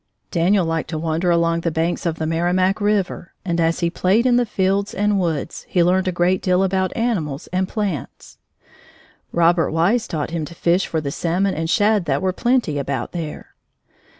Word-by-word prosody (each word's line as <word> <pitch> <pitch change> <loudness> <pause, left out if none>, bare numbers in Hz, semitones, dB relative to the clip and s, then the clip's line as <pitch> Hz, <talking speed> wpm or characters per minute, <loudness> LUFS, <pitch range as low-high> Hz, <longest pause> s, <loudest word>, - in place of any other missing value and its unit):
Daniel 180 +2 +2
liked 165 -1 -2
to 160 - -3
wander 165 +2 -1
along 170 -1 +2
the 170 - 0
banks 165 +2 -1
of 165 -1 -2
the 160 - -2
Merrimac 180 +5 +1
River, 205 -4 -1
and 170 -2 0
as 165 +2 +1
he 170 -1 +1
played 195 +7 +2
in 250 -1 +4
the 245 -1 +2
fields 195 +1 0
and 205 0 +1
woods, 165 -4 -2
he 175 - +3
learned 185 +2 +2
a - - +2
great 180 +1 +1
deal 185 0 +2
about 190 0 0
animals 180 - -1
and 185 +1 0
plants. 195 - -5 0.9
Robert 170 0 +3
Wise 195 +9 +1
taught 155 -1 -3
him 165 -2 -2
to 160 +3 -8
fish 175 +3 +1
for 160 - -2
the 140 -2 -3
salmon 180 +6 0
and 160 +1 -3
shad 205 0 +2
that 140 -3 0
were 185 -1 +1
plenty 240 - +1
about 135 -3 -3
there. 160 -4 -6
175 Hz, 190 wpm, -21 LUFS, 165-195 Hz, 0.9 s, in